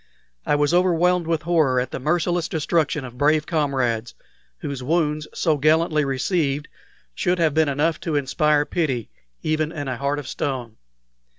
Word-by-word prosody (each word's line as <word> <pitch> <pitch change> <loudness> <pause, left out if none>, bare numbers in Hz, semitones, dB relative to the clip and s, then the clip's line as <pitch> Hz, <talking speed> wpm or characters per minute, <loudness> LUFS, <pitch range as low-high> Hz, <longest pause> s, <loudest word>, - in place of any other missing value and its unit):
I - - +3
was 145 +2 +1
overwhelmed 180 -1 +3
with 165 -2 0
horror 155 -6 +2
at 125 0 -3
the - - -4
merciless 170 +4 0
destruction 155 -3 0
of 125 0 -11
brave 150 +1 +3
comrades, 130 -8 -1 0.4
whose 140 - -5
wounds, 150 +1 0
so 160 -4 +1
gallantly 155 +1 +3
received, 140 +1 -1 0.5
should 180 - 0
have 160 -4 +2
been 155 -1 +3
enough 150 +3 0
to 160 -3 -3
inspire 145 +2 +2
pity 135 -11 -2 0.3
even 155 0 0
in 145 -4 -5
a 130 -2 -3
heart 140 +2 -1
of 145 -3 -6
stone. 125 -6 -4
150 Hz, 160 wpm, -23 LUFS, 135-165 Hz, 0.5 s, I